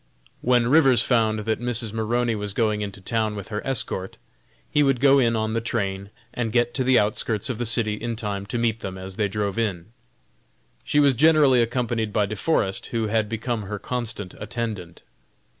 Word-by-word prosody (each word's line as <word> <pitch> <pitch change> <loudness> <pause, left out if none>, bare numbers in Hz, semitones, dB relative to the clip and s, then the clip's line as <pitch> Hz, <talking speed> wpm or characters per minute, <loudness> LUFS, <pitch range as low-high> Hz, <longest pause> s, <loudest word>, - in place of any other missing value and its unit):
When 125 -1 +3
Rivers 135 -1 +5
found 110 -3 +2
that 110 0 0
Mrs. 120 -3 -2
Maroney 115 +2 0
was 105 -2 -3
going 110 -2 +1
into 100 -1 -5
town 110 +2 -1
with 100 -2 -7
her 105 -1 -3
escort, 105 -7 -3 0.5
he 150 - +3
would 135 -3 +2
go 140 +1 +5
in 115 -3 +2
on 110 0 -1
the 115 - 0
train 100 -4 -3 0.2
and 115 -2 -2
get 120 +1 +1
to 130 - 0
the 130 0 +4
outskirts 105 +2 +1
of 120 - -6
the 120 - 0
city 110 -1 +1
in 115 +2 -4
time 100 -3 -4
to 115 - -3
meet 115 -1 0
them 95 -3 -6
as 95 +1 -8
they 105 -2 +1
drove 100 +1 -2
in. 100 -3 -2 0.9
She 150 - +1
was 140 -2 +5
generally 145 -2 +5
accompanied 115 -2 -1
by 105 0 +1
De 105 +2 -5
Forest, 95 -6 0
who 115 -2 -2
had 110 -1 0
become 115 +1 -2
her 105 +1 -5
constant 110 -4 -4
attendant. 105 -6 -5
115 Hz, 190 wpm, -24 LUFS, 105-120 Hz, 0.9 s, Rivers